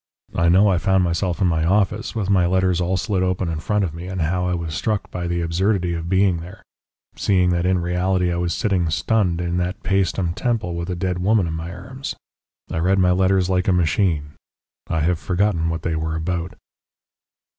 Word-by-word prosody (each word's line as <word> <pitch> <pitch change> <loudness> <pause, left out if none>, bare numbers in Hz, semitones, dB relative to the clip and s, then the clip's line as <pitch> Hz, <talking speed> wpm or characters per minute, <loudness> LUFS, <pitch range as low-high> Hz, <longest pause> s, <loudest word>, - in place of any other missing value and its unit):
I 85 0 +2
know 95 +4 +5
I 90 -4 +2
found 95 +2 +2
myself 90 +2 -1
in 95 - +4
my 80 -2 +1
office, 105 +6 +1
with 105 -4 -1
my 95 -3 +3
letters 90 -1 +1
all 90 +2 0
slit 95 +1 -1
open 90 -1 0
in 80 -1 -3
front 105 +6 0
of 85 -5 -2
me, 85 +2 -7
and 95 0 -4
how 90 +3 0
I 90 - 0
was 85 -2 -4
struck 105 +4 -2
by 90 -1 -4
the 85 0 -1
absurdity 90 +2 0
of 85 0 -4
being 95 -1 +3
there, 90 +3 -11 0.5
seeing 90 -3 +2
that 85 +1 +1
in 95 0 +2
reality 90 +1 0
I - - -2
was 85 0 -1
sitting, 95 -7 0
stunned, 90 +1 +1
in 85 0 -1
that 90 +2 -3
Paestum 95 -3 0
temple 110 -5 -1
with 85 +1 -4
a 90 - -2
dead 90 0 -2
woman 100 +1 +2
in 80 - -3
my 80 +1 -5
arms. 130 +10 -7 0.6
I - - -1
read 95 +4 +2
my 90 -1 +4
letters 95 0 +2
like 90 -1 0
a 95 - +4
machine. 80 -3 +1 0.6
I 80 - -1
have 85 +1 +1
forgotten 90 -3 0
what 80 -1 -3
they 85 -2 -1
were 80 0 -2
about." 85 +1 -3
90 Hz, 210 wpm, -21 LUFS, 85-95 Hz, 0.6 s, know